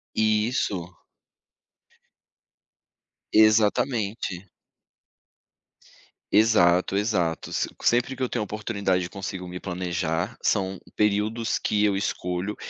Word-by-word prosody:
Isso. 105 -5 0 2.4
Exatamente. 110 -3 +2 1.9
Exato, 95 -4 +4
exato, 95 -6 -1
se - - -1
sempre 125 +2 +2
que 130 - -5
eu 125 - +1
tenho 120 - -2
oportunidade, 100 -4 -2
consigo 95 -2 -6
me 90 0 -7
planejar. 90 +1 -2
São 95 -2 0 0.2
períodos 105 +2 +1
que 105 0 +1
eu 100 -2 +3
escolho 90 0 -2
100 Hz, 85 wpm, -25 LUFS, 90-110 Hz, 2.4 s, Exato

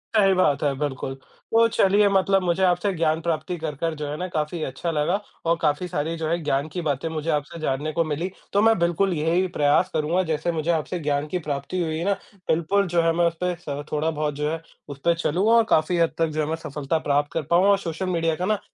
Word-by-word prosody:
सही 195 -2 +5
बात 150 -7 +2
है, 140 -2 +2
बिल्कुल। 135 -2 -3 0.4
तो 230 0 +6
चलिए 205 -1 +3
मतलब 195 0 +3
मुझे 180 +2 +1
आपसे 180 +2 +2
ज्ञान 160 -1 +1
प्राप्ति 170 +2 -2
कर, 155 -2 -4
कर 165 +3 -2
जो 150 -1 -5
है 150 - -4
ना 185 - -3
काफ़ी 160 -1 -3
अच्छा 135 +6 -3
लगा 165 +6 +1 0.3
और 170 +1 +3
काफ़ी 155 +3 +1
सारी 160 +1 -2
जो 160 -1 -2
है 170 - +1
ज्ञान 140 +1 0
की 180 - -2
बातें 145 0 -1
मुझे 160 0 -4
आपसे 150 +3 -2
जानने 150 +1 -1
को 165 - +2
मिली, 155 +4 -2 0.2
तो 200 - +4
मैं 225 -1 +5
बिल्कुल 175 +2 +1
यही 165 +4 +1
प्रयास 150 +5 +3
करूँगा 160 +4 +1
जैसे 160 +1 -1
मुझे 165 +1 0
आपसे 165 +2 -1
ज्ञान 145 -1 -1
की 180 +3 -2
प्राप्ति 140 +6 -2
हुई 160 -1 -1
है 170 - -3
ना, 200 - +3 0.3
बिल्कुल 190 +5 +2
जो 170 -1 +2
है 165 0 +3
मैं 175 0 +3
उस 165 - -2
पे 180 0 +1
सर 145 -4 -6
थोड़ा-बहुत 150 -1 -1
जो 150 +1 -1
है 165 0 -4 0.3
उस 140 -1 -8
पे 170 - +5
चलूँगा 180 +6 +1
और 230 -1 +6
काफ़ी 160 +3 +2
हद 165 -1 +3
तक 165 0 +2
जो 155 0 -2
है 150 - -1
मैं 160 - 0
सफलता 150 +2 -1
प्राप्त 145 +1 +1
कर 165 - 0
पाऊँ 175 +3 +4
और 200 - +5
सोशल 170 +1 -4
मीडिया 165 -2 +1
का 180 - -2
ना 210 -1 +1
165 Hz, 245 wpm, -24 LUFS, 150-180 Hz, 0.4 s, तो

